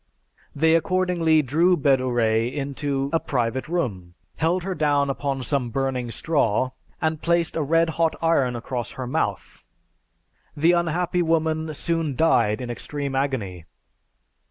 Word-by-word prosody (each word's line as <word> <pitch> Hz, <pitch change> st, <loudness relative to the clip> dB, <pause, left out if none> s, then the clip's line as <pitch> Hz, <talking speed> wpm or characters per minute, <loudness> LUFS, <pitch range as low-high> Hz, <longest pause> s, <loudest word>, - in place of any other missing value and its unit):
They 160 Hz, +2 st, +3 dB
accordingly 165 Hz, -2 st, +2 dB
drew 170 Hz, +7 st, +3 dB
Bedouret 120 Hz, -5 st, +2 dB
into 140 Hz, 0 st, -2 dB
a 165 Hz, -, +3 dB
private 125 Hz, -1 st, -2 dB
room, 100 Hz, -, -3 dB, 0.2 s
held 170 Hz, +3 st, +1 dB
her 190 Hz, 0 st, -2 dB
down 145 Hz, -3 st, +1 dB
upon 135 Hz, -1 st, -3 dB
some 130 Hz, -2 st, -1 dB
burning 130 Hz, -1 st, -2 dB
straw, 130 Hz, -3 st, 0 dB, 0.3 s
and 160 Hz, -1 st, -1 dB
placed 170 Hz, 0 st, +1 dB
a 165 Hz, -, 0 dB
red 165 Hz, +3 st, +2 dB
hot 165 Hz, -1 st, +2 dB
iron 140 Hz, -7 st, +2 dB
across 120 Hz, 0 st, -4 dB
her 130 Hz, -, -5 dB
mouth. 125 Hz, -, -3 dB, 0.9 s
The 160 Hz, +4 st, +4 dB
unhappy 175 Hz, +1 st, 0 dB
woman 160 Hz, -1 st, 0 dB
soon 165 Hz, -2 st, -1 dB
died 115 Hz, -8 st, +2 dB
in 120 Hz, -1 st, -4 dB
extreme 140 Hz, +3 st, -4 dB
agony. 115 Hz, -, -2 dB
145 Hz, 130 wpm, -23 LUFS, 125-165 Hz, 0.9 s, The